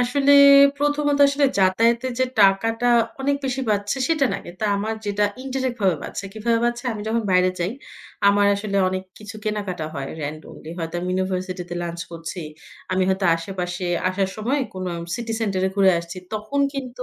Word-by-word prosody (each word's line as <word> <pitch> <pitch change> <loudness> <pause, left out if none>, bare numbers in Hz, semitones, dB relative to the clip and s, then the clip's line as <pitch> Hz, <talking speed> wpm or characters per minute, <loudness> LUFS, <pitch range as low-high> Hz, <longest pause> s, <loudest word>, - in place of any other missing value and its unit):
আসলে 275 +3 +3 0.5
১ম 290 +1 0
ত - - -1
আসলে 280 0 +2
যাতায়াতে 230 +6 +3
যে 260 - +3 0.2
টাকাটা 225 +5 +3 0.3
অনেক 280 +1 +1
বেশি 265 0 -1
বাঁচছে 205 +4 0
সেটা 310 -4 +2
না। - - -1
এটা 180 +5 -6
আমার 215 +2 -2
যেটা 205 0 +1 0.2
ইনডিরেক্ট 260 -2 -2
ভাবে 185 -4 +3
বাঁচছে - - -6
কিভাবে 230 +2 0
বাঁচছে? 240 +1 -1
আমি 210 -2 -6
যখন 230 +1 0
বাইরে 185 0 +4
যাই, 175 +4 -1 0.6
আমার 205 0 +4
আসলে 200 0 -3
অনেক 185 0 -3 0.2
কিছু 210 0 -9
কেনাকাটা 200 -6 -3
হয় 135 0 -4
randomly 155 +1 -7
হয়তো 165 0 -5
আমি 180 - -4
ইউনিভার্সিটি 185 0 -2
তে - - -3
লাঞ্চ 170 0 -5
করছি, 165 +2 -6 0.5
আমি 185 0 +2
হয়তো 190 +1 0
আশেপাশে 180 +1 -5 0.2
আসার 190 +1 -1
সময় 240 +7 0 0.2
কোন 185 0 -4 0.3
সিটি 235 -1 -4
সেন্টার 200 -4 -1
এ - - +1
ঘুরে 195 -1 +5
আসছি 170 +2 -8 0.2
তখন 215 +6 -2
কিন্তু 255 -2 -5
205 Hz, 175 wpm, -22 LUFS, 185-240 Hz, 0.6 s, ঘুরে